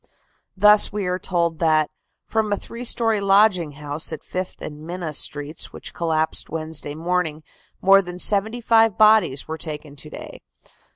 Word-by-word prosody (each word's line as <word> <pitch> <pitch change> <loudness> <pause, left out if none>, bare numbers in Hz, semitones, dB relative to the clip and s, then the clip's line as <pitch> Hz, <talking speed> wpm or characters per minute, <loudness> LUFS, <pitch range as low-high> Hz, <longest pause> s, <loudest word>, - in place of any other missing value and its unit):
Thus 210 +2 +6
we 205 -2 -3
are 180 0 -1
told 170 -3 -1
that 155 -2 +2 0.3
"from 220 -1 -1
a 205 - +1
three 235 +4 -9
story 225 -3 +1
lodging 195 -5 +3
house 145 +2 -1
at 160 - -7
Fifth 185 0 -5
and 150 0 -8
Minna 170 -1 -5
Streets, 145 +1 -2
which - - -9
collapsed 160 -2 -1
Wednesday 155 -2 -4
morning, 160 -2 -2 0.4
more 195 +1 +6
than 180 -1 -8
seventy 215 +5 +1
five 225 -3 +3
bodies 215 -10 +4
were 160 0 -5
taken 150 -2 -6
to 150 - -8
day. - - -10
175 Hz, 160 wpm, -22 LUFS, 155-205 Hz, 0.4 s, Thus